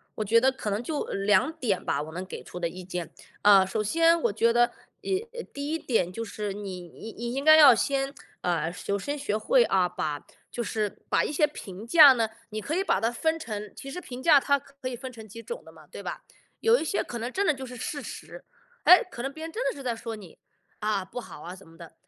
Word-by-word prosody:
我 215 - -2
觉 230 +3 +4
得 265 +2 +4
可 260 -5 -5
能 205 +3 -2
就 300 +3 -2
2 200 +7 +2
点 240 - -1
吧， 140 - -1
我 155 +1 -7
能 180 +2 -5
给 185 - -8
出 180 - -8
的 170 - 0
意 185 +2 -9
见。 180 -1 -6 0.3
啊， 200 -2 +7
首 215 +3 -2
先， 330 +9 +4
我 230 - +2
觉 230 +3 +3
得， 240 +1 +5
呃， 385 - -11 0.2
呃， 475 -1 -5
第 280 +1 -4
一 325 +1 -1
点 185 - 0
就 230 +5 -5
是 210 -2 -4
你 195 -3 -6
你 225 +6 -10
你 235 +1 -5
应 275 +2 -2
该 310 0 +8
要 290 -5 +9
先 270 +3 0 0.3
呃， 170 -2 0
首 200 +3 -3
先 290 +7 -3
学 215 -7 -1
会 - - +4
啊， 185 -2 +2
把 150 -4 -4 0.3
就 240 - -3
是 215 -2 -1 0.2
把 - - +3
一 - - -2
些 300 +1 +3
评 210 -6 -9
价 295 -1 +9
呢， 225 -3 0 0.2
你 215 - -4
可 295 +9 -3
以 380 - +1
把 195 - +1
它 225 - +1
分 320 +6 0
成 210 -7 -6
其 275 - -9
实 360 +6 -6
评 250 -5 -8
价 295 0 +6
它 280 +1 +2
可 275 -1 -8
以 250 - -5
分 255 +1 -8
成 220 -2 -11
几 230 +3 -10
种 475 - -7
的 - - -14
嘛， - - -17
对 - - -10
吧？ - - -6 0.4
有 455 +2 +4
一 - - -2
些 330 +5 0
可 240 - -6
能 235 +2 -4
真 400 +6 0
的 - - +4
就 265 -1 -7
是 250 0 -9
事 285 +5 -4
实， - - -9 0.4
诶， 365 - +8
可 240 - -7
能 270 +2 -3
别 315 +2 -9
人 325 - -7
真 460 +8 -3
的 - - +1
是 275 - -9
在 245 -3 -2
说 225 0 -6
你， 195 -6 -13 0.4
啊， 210 -2 0
不 195 - -7
好 150 - -11
啊 180 +3 -8
怎 190 -3 -16
么 165 - -17
的。 170 -1 -12
235 Hz, 275 characters per minute, -27 LUFS, 200-285 Hz, 0.4 s, 要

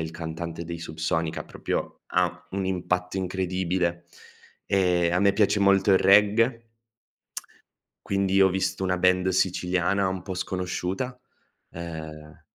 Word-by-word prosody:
il 80 - -5
cantante 85 0 -6
dei 85 0 -6
Subsonica, 80 0 -2
proprio - - -4
ha - - 0
un 95 0 -2
impatto 90 0 -2
incredibile. 90 -2 -1 0.6
Ehm, 90 -3 +2
a 90 - +2
me 100 0 +4
piace 100 0 +2
molto 100 0 +4
il 95 - +6
reggae 115 +4 +4 1.4
quindi 100 0 +2
ho 95 - +6
visto 95 +1 -1
una 90 -1 0
band 90 +1 +3
siciliana 95 +1 +1
un 95 -1 -4
po' 95 -2 -5
sconosciuta, 95 +6 -3 0.5
ehm 80 -2 -8
90 Hz, 125 wpm, -26 LUFS, 85-95 Hz, 1.4 s, il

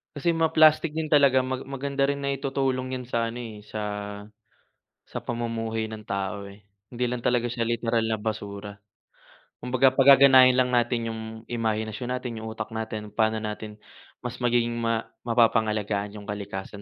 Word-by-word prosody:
Kasi 170 +4 +1
mga 165 -1 +1
plastic 155 0 +6
din 160 - 0
talaga, 140 -3 +5
mag 130 0 -3
maganda 140 +1 -3
rin 140 - 0
na 140 - +1
itutulong 135 -2 -1
yan 125 - -8
sa 115 -1 -1
ano 115 - -7
eh, 110 -3 -8
sa 105 +1 -6 1.3
sa - - -5
pamumuhay 115 -2 -3
ng 110 -1 -7
tao 100 0 -3
eh, 100 +1 -16 0.3
hindi 125 0 -2
lang 125 - -2
talaga 120 -1 +1
siya 120 -1 -2
literal 115 0 0
na 110 - 0
basura. 105 -1 -5 0.9
Kumbaga, 130 +1 +3
pagaganahin 135 -1 +7
lang 125 -1 +3
natin 120 -1 +1
'yong, 110 0 -5 0.3
imahinasyon 110 0 -2
natin, 125 -2 -5
'yong 110 - -6
utak 110 -1 -5
natin, 110 -1 -4
pa'no 110 0 +2
natin 105 0 -5 0.5
mas 125 - -4
magiging 120 -1 +2
ma 115 -1 0 0.2
mapapangalagaan 110 -3 +1
'yong 105 -1 -9
kalikasan 100 0 -6
115 Hz, 160 wpm, -26 LUFS, 110-130 Hz, 1.3 s, pagaganahin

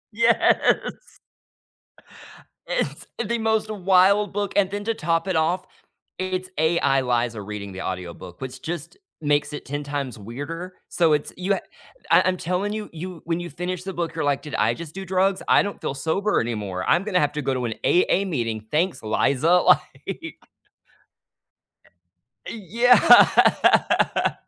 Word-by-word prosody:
Yes. 230 +1 +3 1.8
It's - - -2 0.2
the 235 0 -1
most 220 -1 0
wild 195 0 +3
book 205 0 -2
and 195 -2 +3
then 205 +1 -4
to 225 +1 -1
top 165 0 -1
it 185 - 0
off, 175 +4 +1 0.5
it's 185 0 -3
AI 155 -4 +2
Liza 120 -3 -1
reading 100 -1 -7
the 95 - -7
audiobook, 90 -1 -7
which 130 -1 -7
just 170 -1 -6 0.2
makes 145 -1 0
it 150 - -7
10 145 +2 -4
times 140 -4 -4
weirder, 145 - -7
so 165 -2 +2
it's 150 -1 0
you 185 +3 0
ha - - -3 0.5
I - - +6
I'm 185 0 +1
telling 185 +5 -2
you 215 -1 -5
you 170 +1 -7
when 165 +1 -2
you 175 0 -6
finish 180 +3 -4
the 190 - -4
book, 170 -2 -3
you're 160 - -2
like, 145 -1 +1
"Did 150 - -8
I - - +2
just 165 -1 -9
do 195 - -6
drugs? 190 +1 +1
I - - +5
don't 205 0 -6
feel 135 - -3
sober 165 +9 0
anymore, 105 -6 -3
I'm 175 - +4
gonna 190 -4 +1
have 145 -1 +1
to 150 0 -4
go 135 0 0
to 125 -1 -2
an 110 - -3
AA 180 +2 +3
meeting, 115 - -3
thanks, 170 +1 0
Liza," 140 +8 +1
like - - 0 2.1
E 220 -3 -8
yeah. 240 +6 +5
170 Hz, 160 wpm, -23 LUFS, 135-190 Hz, 2.1 s, I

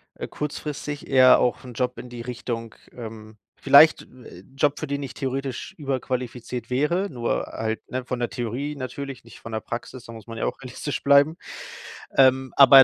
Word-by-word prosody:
äh, - - -6
kurzfristig, 150 0 -5
eher 130 -1 +7
auch 125 - 0
'n 125 - -9
Job 125 +2 -1
in - - -8
die 120 -1 -8
Richtung, 115 -1 -5 0.2
ähm 110 -2 -9 0.3
vielleicht, 155 +3 +8
äh, 125 -8 -14 0.2
Job, 145 +1 +2
für 155 - -4
den 140 0 -2
ich 135 - -6
theoretisch 135 +3 -4
überqualifiziert 125 -4 -3
wäre, 165 +9 +1
nur 120 -3 -1
halt, 110 0 -4
ne, 130 0 -2
von 125 - -2
der 120 - -1
Theorie 125 +5 -3
natürlich, 135 0 -6
nicht 115 - -14
von 115 - -9
der 110 - -1
Praxis. 120 +2 -7
Da 115 - -9
muss 110 -1 -11
man 115 - -8
ja - - 0
auch - - -4
realistisch 130 +3 -4
bleiben. 140 +3 +5 0.8
Ähm, 130 0 +5
aber 135 -1 +10
130 Hz, 180 wpm, -24 LUFS, 120-140 Hz, 0.8 s, aber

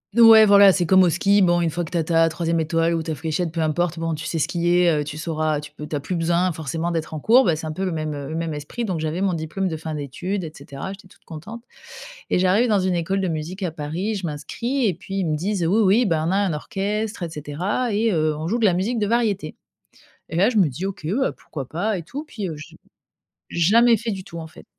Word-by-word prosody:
N 235 - +5
ouais 225 -1 +9
voilà 200 -1 +7
c'est 180 -1 0
comme 190 +3 +5
au 175 - +4
ski, 200 +4 +3
bon 175 -2 +4
une 170 -2 0
fois 175 +3 -2
que 160 - -7
tu 175 - -1
as 165 - +1
ta 165 0 +3
3e 165 +1 -1
étoile 165 +1 +1
ou 165 - 0
ta 160 -1 -4
fléchette 165 +2 -2
peu 165 0 -2
importe, 165 +2 0
bon 165 0 -2
tu 155 0 -5
sais 165 - -2
skier, 175 +2 +2
heu, 150 -2 +1
tu 150 +1 -7
sauras, 155 -1 -1
tu 150 - -10
peux 150 0 -9
tu - - -4
as - - -1
plus 160 +6 -4
besoin 170 +2 +1
forcément 160 +2 -3
d'être 160 -1 -3
en - - -4
cours, 240 - +5
bah 170 -4 +2
c'est 160 +1 -6
un 155 - -3
peu 185 +5 -4
le 185 - -1
même, 155 -2 -3
heu, 140 -1 -6
le 160 - -4
même 165 -1 -2
esprit 150 +11 -5
donc 185 -6 -2
j'avais 160 +3 -2
mon 195 -2 +1
diplôme 165 +4 -3
de 165 - -3
fin 155 0 -5
d'études 175 +7 -4
et 160 - -6
cetera. 140 +7 -7
J'étais 190 -1 -14
toute - - -24
contente. 200 +9 -9 0.7
Et - - +2
j'arrive 195 +7 +3
dans 210 -2 +3
une 185 -1 0
école 190 +3 -1
de 190 - 0
musique 165 +5 -4
à 175 - -1
Paris, 160 +7 -3
je 190 - -4
m'inscris 235 - -2
et 185 - +1
puis 190 +4 -8
ils 190 - 0
me 155 -2 0
disent: 180 +2 -1
«Oui, 210 +6 +3
oui, 210 +5 +4
bah, 165 -5 +1
on 175 - 0
a 195 - +2
un 200 -4 +1
orchestre 205 +6 -3
et 170 - -3
cetera 175 - -2
et 220 +2 +2
heu, 155 -2 +1
on 155 - -4
joue 230 +7 0
de 220 - +2
la 185 - +4
musique 210 +7 -1
de 205 - 0
variété». 210 -8 0 0.7
Et - - -6
là 200 +5 +4
je 250 - -5
me 190 -5 +5
dis: 155 +9 -5
«OK 195 -5 -6
bah 265 - 0
pourquoi 140 -5 -8
pas 200 +8 -1
et 170 - -6
tout 260 - -6
puis». 215 -10 -5
Heu, 160 - -5
j'ai 160 +2 -12 0.7
jamais 225 +8 +4
fait 235 0 -5
du 190 -2 -5
tout 170 -2 -9
en 160 - -7
fait. 155 - -15
175 Hz, 275 wpm, -22 LUFS, 155-195 Hz, 0.7 s, ouais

